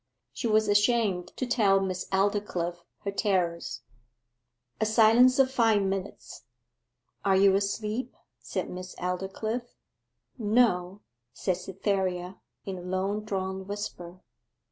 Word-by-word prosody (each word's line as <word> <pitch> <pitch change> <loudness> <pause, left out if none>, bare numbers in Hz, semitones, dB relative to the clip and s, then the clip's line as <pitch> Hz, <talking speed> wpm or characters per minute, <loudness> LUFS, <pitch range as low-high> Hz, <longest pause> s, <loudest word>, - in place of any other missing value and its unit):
She 235 - -2
was 215 -1 +3
ashamed 205 -3 +2
to 255 - -1
tell 215 -6 +3
Miss 185 -2 -3
Aldclyffe 190 -3 -1 0.2
her 200 - -1
terrors. 175 - -1 1.0
A - - +2
silence 230 +4 +6
of 265 -1 +4
five 225 -5 +3
minutes. 195 0 -4 0.8
'Are 195 -1 +3
you 195 0 +5
asleep?' 210 +5 -2 0.2
said - - -4
Miss 185 0 -7
Aldclyffe. 195 +6 -3 0.6
'No,' 205 -4 +2 0.3
said 185 -2 -1
Cytherea, 185 -1 -2 0.3
in 190 -2 -5
a - - -8
long 190 +3 -2
drawn 190 -2 -3
whisper. 185 -3 -6
195 Hz, 115 wpm, -28 LUFS, 185-215 Hz, 1.0 s, silence